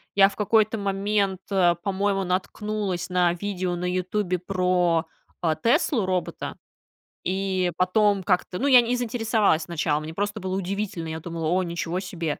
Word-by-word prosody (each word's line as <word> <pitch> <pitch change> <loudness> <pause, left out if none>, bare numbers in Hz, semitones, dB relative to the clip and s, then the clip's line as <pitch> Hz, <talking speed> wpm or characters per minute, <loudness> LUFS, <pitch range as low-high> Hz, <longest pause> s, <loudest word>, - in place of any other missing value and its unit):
я 195 0 +7
в - - -12
какой-то 220 +1 +2
момент, 200 -1 0
э, 180 -3 +4
по-моему, 195 0 0
наткнулась 190 0 -2
на 180 -1 +2
видео 185 -1 -3
на 175 +1 -4
"Ютубе" 185 0 -1
про, 180 -2 +1 0.4
э, 160 -2 +2
"Теслу"-робота, 230 - 0 0.7
и 185 -1 0
потом 200 +2 +3
как-то, 180 -1 0
ну, 280 - +1
я 250 -3 +8
не 240 +1 0
заинтересовалась 225 -8 +1
сначала, 155 -3 -1
мне 155 +1 -7
просто 205 +3 -2
было 185 -1 -3
удивительно. 195 -2 -3
Я 160 0 -4
думала: 165 -1 -4
"О, 185 +3 +2
ничего 170 +1 -3
себе!" 170 -5 -4
185 Hz, 150 wpm, -25 LUFS, 175-205 Hz, 0.7 s, я